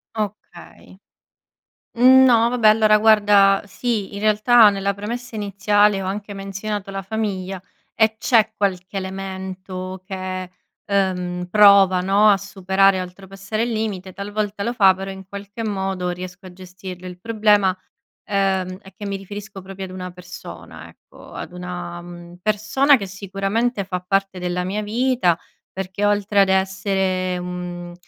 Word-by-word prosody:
Okay. 210 Hz, -1 st, -7 dB, 1.0 s
Mhmm, 260 Hz, +2 st, +7 dB
no 235 Hz, -2 st, +5 dB
vabbè 240 Hz, -3 st, +2 dB
allora 215 Hz, 0 st, +5 dB
guarda, 205 Hz, -2 st, +5 dB
sì 210 Hz, -1 st, -3 dB
in 200 Hz, -, -6 dB
realtà 215 Hz, +1 st, +6 dB
nella 200 Hz, 0 st, -1 dB
premessa 230 Hz, +4 st, -6 dB
iniziale 205 Hz, 0 st, +2 dB
ho -, -, -5 dB
anche 205 Hz, +1 st, -4 dB
menzionato 195 Hz, +1 st, -5 dB
la 195 Hz, 0 st, -4 dB
famiglia 195 Hz, -2 st, -4 dB, 0.3 s
e 220 Hz, 0 st, +2 dB
c'è 220 Hz, -2 st, +2 dB
qualche 195 Hz, -1 st, -2 dB
elemento 190 Hz, -1 st, -6 dB
che, 185 Hz, -2 st, -5 dB, 0.3 s
ehm, 180 Hz, -3 st, -1 dB
prova 200 Hz, -3 st, +6 dB
no, 200 Hz, +3 st, +4 dB
a 200 Hz, -, +5 dB
superare 195 Hz, -1 st, +2 dB
a -, -, -2 dB
oltrepassare 195 Hz, +4 st, -5 dB
il 240 Hz, -, -2 dB
limite, 200 Hz, -4 st, -3 dB
talvolta 205 Hz, 0 st, -3 dB
lo 235 Hz, -, -1 dB
fa 195 Hz, -5 st, +5 dB
però 195 Hz, +1 st, -7 dB
in 190 Hz, 0 st, -10 dB
qualche 200 Hz, +3 st, -7 dB
modo 190 Hz, -3 st, -2 dB
riesco 180 Hz, +1 st, -7 dB
a 180 Hz, -, -10 dB
gestirlo. 185 Hz, 0 st, -10 dB
Il 180 Hz, 0 st, -10 dB
problema, 210 Hz, -3 st, +2 dB, 0.5 s
ehm, 190 Hz, -2 st, 0 dB
è 190 Hz, -1 st, -16 dB
che 205 Hz, +1 st, -9 dB
mi 200 Hz, -, -3 dB
riferisco 200 Hz, 0 st, -9 dB
proprio 195 Hz, 0 st, -7 dB
ad 185 Hz, -, -10 dB
una 180 Hz, -1 st, -6 dB
persona 180 Hz, 0 st, -11 dB
ecco. -, -, -17 dB
Ad -, -, -7 dB
una, 175 Hz, -1 st, -6 dB
mhmm, 175 Hz, 0 st, -11 dB
persona 215 Hz, +7 st, +3 dB
che 200 Hz, -, -5 dB
sicuramente 195 Hz, +3 st, -2 dB
fa 180 Hz, -2 st, -4 dB
parte 195 Hz, -1 st, 0 dB
della 180 Hz, 0 st, -2 dB
mia 205 Hz, +3 st, -2 dB
vita 225 Hz, -6 st, +1 dB, 0.3 s
perché 190 Hz, +2 st, -3 dB
oltre 205 Hz, 0 st, +2 dB
ad 195 Hz, -, +3 dB
essere, 190 Hz, -1 st, 0 dB
mhmm, 180 Hz, -1 st, -6 dB
195 Hz, 145 wpm, -21 LUFS, 185-210 Hz, 1.0 s, Mhmm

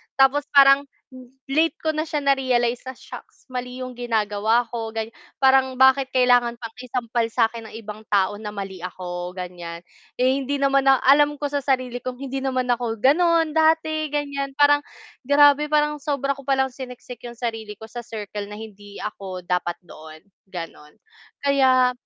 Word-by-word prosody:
Tapos 280 Hz, +2 st, +3 dB
parang 275 Hz, 0 st, +7 dB, 0.2 s
l 255 Hz, -1 st, -12 dB, 0.2 s
late 320 Hz, +4 st, +2 dB
ko 315 Hz, -, 0 dB
na 310 Hz, -, 0 dB
siya 305 Hz, -2 st, -1 dB
na-realize 250 Hz, -3 st, +1 dB
na -, -, -3 dB
"Shocks, -, -, -13 dB
mali 250 Hz, 0 st, -5 dB
yung 255 Hz, -, -6 dB
ginagawa 220 Hz, -1 st, +1 dB
ko." 225 Hz, -2 st, -4 dB
Gan 220 Hz, 0 st, -2 dB, 0.4 s
parang 265 Hz, 0 st, +4 dB
bakit 265 Hz, 0 st, +5 dB
kailangan 245 Hz, -2 st, +3 dB
pang 230 Hz, -2 st, -8 dB
isampal 240 Hz, -2 st, -2 dB
sa 230 Hz, -2 st, +3 dB
akin 230 Hz, -1 st, -8 dB
ng -, -, -12 dB
ibang 215 Hz, -1 st, -9 dB
tao 200 Hz, 0 st, +2 dB
na 210 Hz, -1 st, -6 dB
mali 195 Hz, -2 st, -6 dB
ako, 180 Hz, -1 st, -5 dB
ganyan. 175 Hz, -2 st, -7 dB, 0.4 s
Eh, 260 Hz, +2 st, +3 dB
hindi 275 Hz, +1 st, -2 dB
naman 275 Hz, 0 st, +2 dB
na 270 Hz, -1 st, +6 dB
alam 290 Hz, +2 st, +5 dB
ko 290 Hz, -, -1 dB
sa 285 Hz, -, 0 dB
sarili 255 Hz, -3 st, -1 dB
kong 255 Hz, 0 st, -5 dB
hindi 270 Hz, 0 st, -4 dB
naman 255 Hz, -1 st, -1 dB
ako, 240 Hz, -2 st, -1 dB
gano'n, 325 Hz, +4 st, +3 dB
dati 315 Hz, -1 st, +2 dB
ganyan, 280 Hz, -2 st, -3 dB
parang 290 Hz, 0 st, +6 dB, 0.4 s
grabe, 290 Hz, +2 st, +5 dB
parang 300 Hz, 0 st, +2 dB
sobra 280 Hz, -2 st, -1 dB
ko 275 Hz, -, -12 dB
palang 265 Hz, -1 st, +1 dB
siniksik 250 Hz, -2 st, -9 dB
'yong 240 Hz, -, -9 dB
sarili 225 Hz, -3 st, -4 dB
ko 220 Hz, -, -10 dB
sa 240 Hz, -, -6 dB
circle 210 Hz, -2 st, -6 dB
na -, -, -6 dB
hindi 205 Hz, -2 st, -11 dB
ako 195 Hz, -3 st, -6 dB
dapat 175 Hz, -1 st, -1 dB
doon, 155 Hz, 0 st, -12 dB, 0.3 s
gano'n. 165 Hz, -4 st, -8 dB, 0.5 s
Kaya 260 Hz, -2 st, +4 dB
250 Hz, 170 wpm, -23 LUFS, 220-275 Hz, 0.5 s, parang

